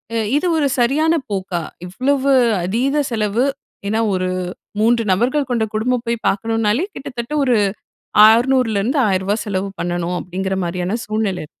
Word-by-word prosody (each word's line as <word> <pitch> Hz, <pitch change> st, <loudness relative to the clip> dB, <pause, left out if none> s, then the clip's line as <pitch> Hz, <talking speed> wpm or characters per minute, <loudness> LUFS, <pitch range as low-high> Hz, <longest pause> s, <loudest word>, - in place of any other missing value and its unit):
அ -, -, +1 dB, 0.2 s
இது 360 Hz, -, 0 dB
ஒரு 295 Hz, -2 st, +2 dB
சரியான 295 Hz, +7 st, +3 dB, 0.2 s
போக்கா? 185 Hz, -3 st, -2 dB, 0.2 s
இவ்வளவு 270 Hz, +7 st, 0 dB, 0.3 s
அதீத 265 Hz, +10 st, +1 dB
செலவு! 220 Hz, +2 st, +1 dB, 0.4 s
ஏன்னா 220 Hz, +2 st, 0 dB, 0.2 s
ஒரு 185 Hz, 0 st, -1 dB, 0.5 s
3 230 Hz, +2 st, +3 dB
நபர்கள் 255 Hz, +7 st, +1 dB
கொண்ட 235 Hz, -2 st, +1 dB
குடும்பம் 240 Hz, +3 st, 0 dB
போய் 235 Hz, 0 st, 0 dB
பாக்கணும்னாலே 225 Hz, -, +1 dB
கிட்டத்தட்ட 250 Hz, 0 st, -6 dB
ஒரு 255 Hz, -3 st, +3 dB, 0.7 s
600லேருந்து 235 Hz, -1 st, +3 dB
இருந்து 260 Hz, +7 st, 0 dB
ரூ.1000 195 Hz, +3 st, 0 dB
செலவு 200 Hz, -1 st, -2 dB
பண்ணனும், 175 Hz, 0 st, -2 dB
அப்படிங்கிற 190 Hz, +1 st, -3 dB
மாரியான 180 Hz, +4 st, -2 dB
சூழ்நிலை 215 Hz, -6 st, -2 dB
225 Hz, 135 wpm, -19 LUFS, 190-255 Hz, 0.7 s, சரியான